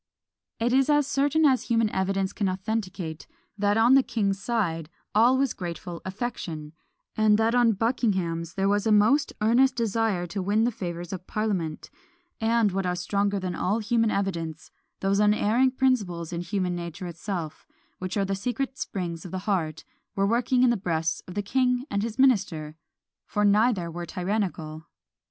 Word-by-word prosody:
It 240 +2 +1
is 270 +2 +3
as 295 -1 +4
certain 285 +3 +2
as 265 -3 +3
human 230 -1 +2
evidence 190 0 -1
can 200 -3 0
authenticate, 185 -4 -4 0.3
that 205 0 +1
on 230 +3 +5
the 270 - +7
king's 200 -6 -1
side 170 -9 -1 0.2
all 240 +5 +5
was 270 -2 +1
grateful 175 -1 -6
affection; 185 -7 -5 0.4
and 215 -1 +4
that 225 +1 +2
on 240 -2 +4
Buckingham's 190 -7 -1
there 195 0 +1
was 205 +2 +1
a - - +3
most 215 +8 +4
earnest 250 +4 +4
desire 225 -5 0
to 190 +3 -4
win 205 +4 +2
the 240 - +2
favours 175 -5 -5
of 180 -1 -7
parliament; 190 -8 -2 0.5
and 225 -2 +2
what 190 0 -1
are 180 - 0
stronger 200 +2 0
than 185 -1 -3
all 185 +5 0
human 230 0 +1
evidence, 165 -6 -3 0.3
those 195 +1 +1
unerring 215 +4 +3
principles 205 -11 0
in 170 - -2
human 180 0 -1
nature 170 +1 -6
itself, 170 -2 -5 0.3
which 185 +2 -3
are 200 - +1
the 195 - -2
secret 250 +6 -3
springs 170 -4 -4
of 180 - -8
the 185 +2 -5
heart, 165 -7 -1 0.3
were 195 - +2
working 245 +4 +2
in 250 - +5
the 240 - +1
breasts 165 -3 -1
of 180 - -9
the 205 - -1
king 250 +3 +1
and 200 - 0
his 225 +1 -4
minister; 195 - +2 0.5
for 210 0 0
neither 205 -4 +3
were 170 +1 -6
tyrannical. 175 -5 -3
200 Hz, 170 wpm, -26 LUFS, 175-230 Hz, 0.5 s, the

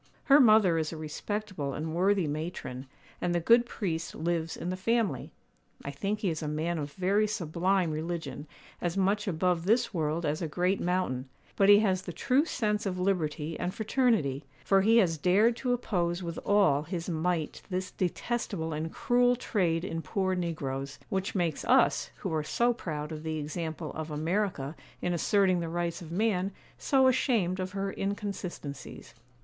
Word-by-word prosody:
Her 280 0 +6
mother 215 - +6
is 155 -1 -2
a 165 - -6
respectable 155 -1 -4
and 160 +1 -4
worthy 190 +1 +2
matron, 145 -4 -5 0.3
and 175 0 0
the - - +3
good 235 +7 +5
priest 165 -8 -3
lives 165 -1 -2
in 175 - -3
the - - -2
family. 195 - 0 0.5
I 140 - -3
think 200 +9 -2
he 190 - +1
is 160 - -4
a 155 - -3
man 160 +3 -1
of 145 -1 -5
very 200 +5 +2
sublime 180 -2 0
religion, 160 -1 -4 0.3
as 175 +1 -1
much 200 +2 +1
above 175 -1 +1
this 230 +3 +2
world 160 0 -1
as 150 +2 -1
a 165 - -1
great 180 +5 0
mountain; 155 -8 -1 0.3
but 195 0 +4
he 205 - +10
has 190 -4 +1
the 180 -2 -7
true 270 - +2
sense 210 -8 -1
of 185 -1 -2
liberty 165 -4 -1
and 180 - -2
fraternity, 220 - +1 0.2
for 195 -1 +4
he 225 +4 +5
has 170 -8 +3
dared 205 +8 +4
to 250 - -1
oppose 180 -7 -1
with 170 -1 -4
all 195 -9 +4
his 170 +2 -5
might 165 -1 -1
this 185 0 -3
detestable 185 -3 -2
and 160 +2 -3
cruel 245 0 +3
trade 180 -8 0
in 165 -3 -3
poor 185 +4 -1
negroes; 140 -6 -3
which 190 +1 -2
makes 170 -5 0
us, - - +3
who - - -4
are 155 - +1
so 240 +10 +2
proud 150 -8 -5
of 155 -1 -5
the 160 0 -3
example 155 +1 -4
of 160 0 -5
America 160 -1 -1 0.2
in 175 - -1
asserting 185 +1 +3
the 165 -1 -3
rights 170 +1 -2
of 165 -2 -9
man, 195 0 +1 0.3
so 265 -2 +3
ashamed 230 -8 +2
for 185 -1 -2
her 195 0 -2
inconsistencies. 190 - -5
175 Hz, 175 wpm, -29 LUFS, 160-200 Hz, 0.5 s, he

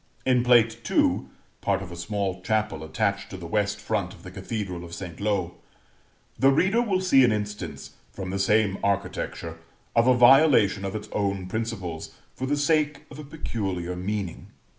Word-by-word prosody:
In 125 -2 +3
plate 115 -2 +4
II. - - +2 0.4
(part 100 -1 0
of 90 - -9
a - - -7
small 95 +1 -3
chapel 105 -5 -1
attached 80 - -1
to 95 - -7
the 90 - -8
West 105 +3 0
front - - -2
of - - -18
the - - -9
Cathedral 95 -6 -5
of 85 0 -8
St. 85 -2 -8
Lo), 95 -4 -1 0.8
the 135 - +6
reader 190 - +3
will 195 -6 0
see 135 -8 +5
an 120 - +4
instance, 105 -1 -4 0.2
from 95 -1 -6
the 95 - -2
same 100 0 +2
architecture, 95 -4 -2 0.4
of 115 +1 +4
a 130 -1 +5
violation 120 -6 +6
of 95 - -4
its 105 - -5
own 100 -2 -1
principles, 95 -5 -4 0.2
for 130 - -4
the 145 +1 +1
sake 150 -1 +1
of 145 - -10
a - - -6
peculiar 95 - -4
meaning. 95 0 -4
105 Hz, 175 wpm, -26 LUFS, 95-125 Hz, 0.8 s, the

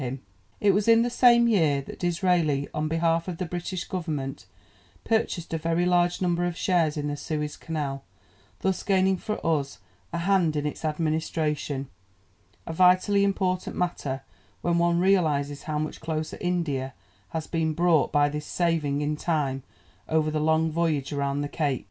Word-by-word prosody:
] 95 0 -36
It 205 - +4
was 205 +2 +1
in 230 0 +6
the 240 - -1
same 240 -1 +5
year 160 -11 +3
that - - -10
Disraeli, 170 -5 +1
on 155 0 -1
behalf 165 +1 +1
of 180 -3 -4
the 180 - -2
British 175 +2 -4
Government, 155 -7 -4 0.6
purchased 220 -7 -1
a 160 - 0
very 165 +2 +1
large 175 0 +2
number 175 -1 +1
of 175 -1 -4
shares 165 -5 +1
in 145 - -2
the 145 - -2
Suez 150 0 -3
Canal, 145 -4 -4 0.6
thus 190 -1 0
gaining 190 -1 +2
for 215 +3 -4
us 145 -4 0 0.3
a - - -2
hand 170 -3 +2
in 150 0 -1
its 150 - -4
administration 155 -3 -1 0.8
a 165 - -5
vitally 185 +3 +4
important 190 -2 0
matter 140 -7 -2 0.4
when 170 0 +1
one 170 0 +2
realizes 150 -7 +2
how 150 - 0
much 155 0 -4
closer 155 0 -3
India 150 -8 -1 0.3
has 160 -1 -4
been 160 -2 -1
brought 170 -2 +3
by 145 0 +4
this 150 +1 -5
saving 160 -5 0
in 150 +1 0
time 150 -4 -1 0.5
over 155 -1 +2
the 155 - -1
long 160 +1 +2
voyage 155 -4 0
round 140 0 -1
the - - -2
Cape. 145 -3 -1
160 Hz, 165 wpm, -26 LUFS, 150-180 Hz, 0.8 s, in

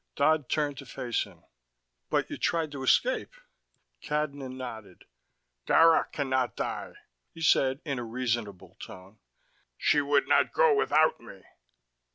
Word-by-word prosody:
Dodd 155 -2 +2
turned 145 -3 -1
to 140 - -10
face 120 -2 -2
him. 90 -5 -19 0.7
"But - - 0
you - - -6
tried 165 -3 0
to 140 -2 -7
escape." - - +1 0.7
Cadnan 145 -3 -3
nodded. 110 -7 -9 0.6
"Dara 165 0 +5
can 140 -2 -3
not 130 -5 0
die," - - -4 0.4
he 165 - -10
said 135 -2 +3
in 140 -4 -3
a - - -4
reasonable 115 -4 -4
tone. 95 +3 -12 0.6
"She 145 - +3
would 140 0 +1
not - - +3
go 480 -3 +4
without 160 - +2
me." 105 -5 -14
135 Hz, 140 wpm, -28 LUFS, 120-155 Hz, 0.7 s, Dara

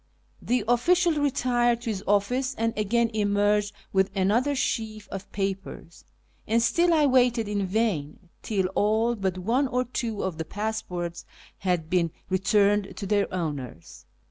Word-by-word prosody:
The 245 -2 0
official 345 +9 +3
retired 245 -5 +1
to 230 - -2
his 195 -2 -5
office 250 +7 +1
and 225 0 0
again 225 +2 +1
emerged 205 0 +1 0.2
with 190 0 +3
another 225 +9 +2
sheaf 220 -5 -2
of 195 0 -7
papers, 195 -3 -5 0.4
and 225 +2 +3
still 340 +10 +3
I 310 -3 +4
waited 250 -4 +3
in 205 -2 -1
vain, 180 -6 -2
till 195 -4 -1
all 220 +4 +2
but 190 -3 -2
one 235 +9 +1
or 250 0 0
two 235 -4 -3
of 180 -4 -3
the - - -1
pass 220 +5 -3
ports 175 -1 -5 0.4
had 180 -5 -1
been 170 -1 +1 0.2
returned 200 +1 +2
to 200 - -4
their 205 0 +1
owners. 140 - -5
210 Hz, 150 wpm, -26 LUFS, 190-240 Hz, 0.4 s, I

